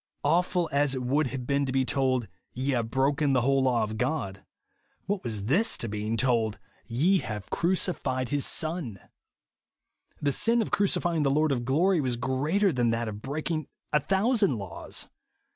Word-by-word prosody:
Awful 175 +3 +2
as 140 -1 +2
it 130 - -3
would 140 +4 +1
have 130 -1 -5
been 140 +2 +1
to - - -1
be 130 0 +1
told, 130 -3 +1 0.3
"Ye 130 +3 -1
have 120 -3 -1
broken 140 +3 +1
the 125 - +3
whole 135 +2 +2
law 125 -3 +2
of 110 0 -4
God 125 -8 -2 0.3
;" - - -43
what 200 -1 -2
was 110 -5 -3
this 175 - +2
to 115 - -2
being 105 +2 -2
told, 115 -3 +1 0.2
" - - -36
Ye 165 +12 +2
have 105 -6 -6
crucified 170 -8 0
his 145 0 +1
Son 155 - -1
T - - -17 1.2
The 145 - +1
sin 230 - +2
of - - -7
crucifying 175 -5 +1
the 140 - +2
Lord 155 +2 +2
of 120 -3 -1
glory 165 +6 +3
was 125 -3 -1
greater 150 - +1
than 120 -2 +1
that 115 0 -1
of 105 -1 -6
breaking 155 +3 -3 0.3
a 150 - +5
thousand 195 - +2
laws. 100 -5 -6
135 Hz, 185 wpm, -27 LUFS, 120-160 Hz, 1.2 s, a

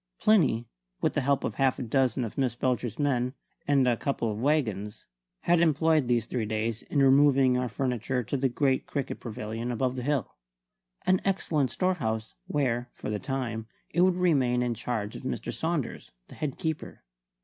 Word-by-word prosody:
Plinny, 145 - +3 0.3
with - - +1
the 145 - +1
help 140 +1 +1
of - - -2
half 135 -2 +2
a - - -3
dozen 125 0 +1
of 110 - -7
Miss 130 -4 0
Belcher's 125 -3 -1
men 130 -3 0 0.3
and 140 -3 +4
a 120 - +4
couple 115 -2 -1
of 105 - -5
waggons, 110 -8 0 0.4
had 175 0 +3
employed 160 -3 +3
these 120 -2 +2
three 115 -2 -2
days 110 +1 -2
in 140 -2 +1
removing 135 -1 +5
our 125 0 0
furniture 125 +1 -1
to 115 - -3
the 135 0 +1
great 130 +1 +1
cricket 140 -3 -3
pavilion 115 +1 -4
above 125 +1 0
the 125 - -3
hill; 135 -3 -1 0.7
an 185 0 +3
excellent 160 -8 +1
storehouse, 115 -10 -1
where, 125 -4 0
for - - -5
the 105 - -2
time, 115 -1 -3 0.2
it 175 - +2
would 185 0 +4
remain 135 -9 +2
in 120 -1 0
charge 115 -2 -3
of - - -7
Mr. 125 -2 -4
Saunders, 160 +3 -3 0.2
the - - -11
head 150 -4 -4
keeper. 160 -2 -4
130 Hz, 180 wpm, -28 LUFS, 115-145 Hz, 0.7 s, removing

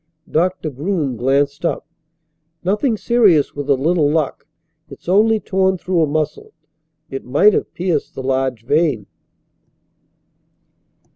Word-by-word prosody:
Doctor 175 -1 0
Groom 145 -1 -2
glanced 140 +4 0
up. 170 - -1 0.8
"Nothing 210 +6 +1
serious 205 - +3
with 145 0 -6
a 140 - +5
little 150 +2 +1
luck. 155 -2 -1 0.4
It's - - -14
only 215 +4 +4
torn 190 -2 +1
through 180 -1 0
a 155 - +3
muscle. 155 +1 -3 0.6
It 135 - -5
might 150 +12 +4
have - - -1
pierced 175 -5 -2
the 130 - -5
large 130 -3 -1
vein." 145 -7 +1
155 Hz, 125 wpm, -19 LUFS, 140-185 Hz, 0.8 s, a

